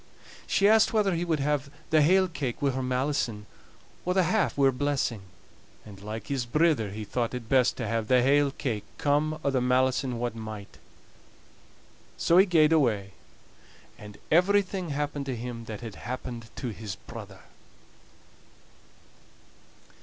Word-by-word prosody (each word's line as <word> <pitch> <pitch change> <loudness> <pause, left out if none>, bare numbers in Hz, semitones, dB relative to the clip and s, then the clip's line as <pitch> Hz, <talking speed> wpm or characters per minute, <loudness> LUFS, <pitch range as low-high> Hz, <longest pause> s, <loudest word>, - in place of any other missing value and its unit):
She 200 - +3
asked 220 +1 +5
whether 210 -4 +2
he 170 0 -1
would 160 -4 0
have 145 -1 0 0.2
the 155 -1 +5
hale 185 +5 +4
cake 145 -7 -4
wi' 140 -2 +1
her 130 +1 -3
malison, 125 -4 -1 0.6
or 180 +1 -1
the 190 - +4
half 205 +1 +1
wi' 140 - +4
her 135 - +5
blessing; 130 -5 -1 0.6
and, 100 -2 -12
like 105 +1 -6
his 135 -3 -2
brither, 150 -5 +2
he 105 +2 -6
thought 120 +3 -2
it 120 -3 -6
best 125 0 +3
to 120 - -3
have 115 0 -1
the 125 0 +4
hale 140 +2 +4
cake, 120 -6 -3
come 150 +2 +1
o' 140 - +1
the 130 -2 +1
malison 125 0 +1
what 120 0 -2
might. 110 -2 -8 1.4
So 170 +2 +4
he 195 - +6
gaed 160 -3 +4
away; 110 -10 +1 0.8
and 105 -1 -12
everything 185 +1 +2
happened 145 -1 -3
to 130 - -2
him 115 0 -6
that 110 -1 -7
had 115 -3 -7
happened 120 +4 -7
to 125 - -4
his 105 -2 -6
brother! 100 -2 -11
130 Hz, 155 wpm, -27 LUFS, 115-155 Hz, 1.4 s, he